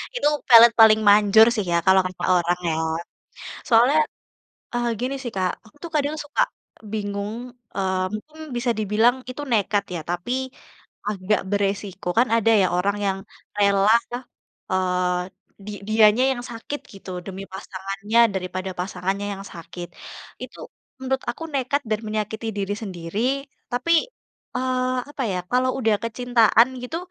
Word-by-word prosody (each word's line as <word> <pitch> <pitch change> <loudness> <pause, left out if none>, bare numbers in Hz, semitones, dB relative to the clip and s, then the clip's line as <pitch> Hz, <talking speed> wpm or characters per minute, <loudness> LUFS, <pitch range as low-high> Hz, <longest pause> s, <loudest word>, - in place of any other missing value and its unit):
Itu 485 - +1 0.2
pelet 235 0 +10
paling 220 -1 +8
manjur 210 +1 +7
sih 210 - 0
ya, 170 - +3
kalau 190 0 +6
kata 185 0 -6
orang, 175 0 +1
ya. 160 - 0 0.9
Soalnya, 245 +6 +5 0.8
eee, 240 0 0
gini 255 +2 -2
sih, 240 - -4
Kak, 185 -1 +1
aku 215 - -20
tuh 335 - -6
kadang 295 0 +1
suka 295 - -1 0.5
bingung, 205 -1 -3 0.4
eee, 190 -1 0
mungkin 305 +9 -10 0.2
bisa 240 0 0
dibilang 215 +4 +3
itu 255 +3 -6
nekat 205 -2 +2
ya, 170 - -3
tapi 175 +6 -3 0.8
agak 205 0 0
berisiko. 200 -1 -2
Kan 245 +2 +4
ada 225 0 +3
ya - - +4
orang 200 +3 +1
yang 195 -1 0 0.4
rela 200 0 +4 0.2
lah, 245 +2 -4 0.5
eee, 180 -1 +1 0.5
di 210 - -5 0.2
dianya 215 +2 +5
yang 240 -2 -5
sakit, 240 +5 -6
gitu, 195 -1 -11 0.2
demi 195 0 -6
pasangannya 195 +3 -1
daripada 185 0 -3
pasangannya 190 +2 -2
yang 195 - -9
sakit. 175 0 -8 0.6
Itu, - - -9 0.4
menurut 265 0 -1
aku 240 - -9
nekat 275 +2 0
dan 215 -1 0
menyakiti 215 +1 -3
diri 200 0 -1
sendiri, 180 -1 -5 0.5
tapi, 295 +7 0 0.6
eee, 255 0 0 0.2
apa 290 -2 -4
ya, 180 - -1
kalau 255 +1 +2
udah 220 -4 +2
kecintaan 230 0 +3
gitu, 250 +7 -4
210 Hz, 145 wpm, -23 LUFS, 190-240 Hz, 0.9 s, pelet